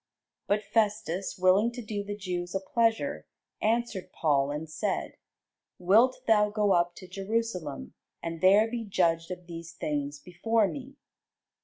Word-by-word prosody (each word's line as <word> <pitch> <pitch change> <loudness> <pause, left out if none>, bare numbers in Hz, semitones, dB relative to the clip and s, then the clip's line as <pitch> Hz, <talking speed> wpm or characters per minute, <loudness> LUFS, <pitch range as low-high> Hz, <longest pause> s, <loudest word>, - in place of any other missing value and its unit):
But 205 +1 +1
Festus, 205 -4 0
willing 190 +5 +4
to 245 - -6
do 205 -1 -3
the 205 0 -5
Jews 180 -2 -4
a - - +2
pleasure, 190 - 0 0.3
answered 220 -4 0
Paul, 140 -3 +1
and 150 +2 -4
said, 155 - -2 0.7
Wilt 230 +8 +4
thou 210 -2 +4
go 210 -1 +1
up 175 0 +2
to 185 - -11
Jerusalem, 190 - -3 0.3
and 165 -1 -5
there 200 +4 +6
be 235 0 -4
judged 170 -5 +1
of 180 -1 -7
these 170 0 -8
things 145 -3 -3
before 205 +7 +1
me? 275 +4 -7
190 Hz, 145 wpm, -28 LUFS, 170-220 Hz, 0.7 s, there